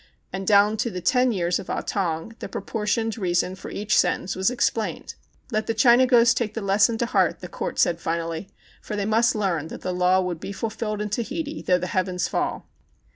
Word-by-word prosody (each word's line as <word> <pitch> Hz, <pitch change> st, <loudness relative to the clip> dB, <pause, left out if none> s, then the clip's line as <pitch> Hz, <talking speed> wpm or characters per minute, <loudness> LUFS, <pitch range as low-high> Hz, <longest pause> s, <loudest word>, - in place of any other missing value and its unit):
And 190 Hz, 0 st, -4 dB
down 205 Hz, +1 st, +5 dB
to 235 Hz, -, 0 dB
the 185 Hz, -, -5 dB
ten 250 Hz, +6 st, +2 dB
years 175 Hz, -4 st, 0 dB
of -, -, -9 dB
Ah -, -, -1 dB
Tong, 175 Hz, +1 st, -2 dB
the -, -, -6 dB
proportioned 225 Hz, 0 st, -2 dB
reason 180 Hz, -1 st, 0 dB
for 190 Hz, -, -9 dB
each 210 Hz, +1 st, -1 dB
sentence 185 Hz, -, +1 dB
was 190 Hz, +2 st, +2 dB
explained. 240 Hz, -3 st, -1 dB, 0.4 s
Let 215 Hz, -1 st, -1 dB
the 225 Hz, -, -1 dB
Chinagos 240 Hz, 0 st, +5 dB
take 230 Hz, -3 st, -2 dB
the 225 Hz, -, -3 dB
lesson 205 Hz, +4 st, +3 dB
to 235 Hz, -, 0 dB
heart, -, -, +1 dB
the -, -, -6 dB
Court -, -, -5 dB
said 170 Hz, -1 st, +2 dB
finally, 165 Hz, +2 st, -3 dB, 0.3 s
for 210 Hz, -, -5 dB
they 205 Hz, -1 st, -1 dB
must 225 Hz, +2 st, +3 dB
learn 180 Hz, -7 st, -1 dB
that -, -, -9 dB
the 185 Hz, -, -3 dB
law 180 Hz, +1 st, +3 dB
would 180 Hz, -3 st, -2 dB
be 200 Hz, -, -6 dB
ful 220 Hz, +3 st, -3 dB
filled 215 Hz, -1 st, -3 dB
in 210 Hz, -, -5 dB
Tahiti 290 Hz, +7 st, -3 dB
though 180 Hz, -, +2 dB
the 180 Hz, -, -3 dB
heavens 180 Hz, 0 st, -1 dB
fell. -, -, -2 dB
205 Hz, 210 wpm, -24 LUFS, 180-225 Hz, 0.4 s, down